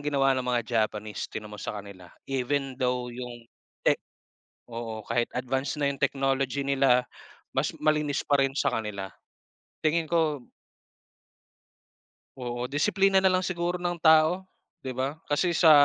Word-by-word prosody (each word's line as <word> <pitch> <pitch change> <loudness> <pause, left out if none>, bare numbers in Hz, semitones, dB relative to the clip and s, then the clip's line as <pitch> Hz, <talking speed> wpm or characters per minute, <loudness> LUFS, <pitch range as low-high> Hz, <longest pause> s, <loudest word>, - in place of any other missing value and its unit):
ginawa 135 -2 +3
ng 130 -1 -1
mga 120 -2 +1
Japanese, 110 -2 -1
tingnan 105 -1 -7
mo 105 - -8
sa - - -4
kanila, 100 -3 -10 0.2
even 135 +1 -1
though 125 -1 0
yung 120 -1 -7 0.4
tech - - +3 0.7
oo 115 -2 -5
kahit 120 +2 0
advanced 130 +2 -1
na 145 -2 +1
yung 140 - -5
technology 135 -1 +1
nila, 135 -2 +4 0.5
mas - - -1
malinis 150 -2 +2
pa 145 - +2
rin 135 0 +2
sa - - +2
kanila. 100 -3 -3 0.7
Tingin 160 +1 +2
ko 155 -5 0 1.9
Oo, 120 -1 -3
disiplina 190 +7 +3
na 190 - +5
lang 185 0 +1
siguro 175 0 -1
ng 175 0 -1
tao 160 +3 +5 0.4
'di 130 - -4
ba? 135 +5 -3
Kasi 170 +4 +2
sa 160 0 +6
135 Hz, 145 wpm, -27 LUFS, 120-155 Hz, 1.9 s, sa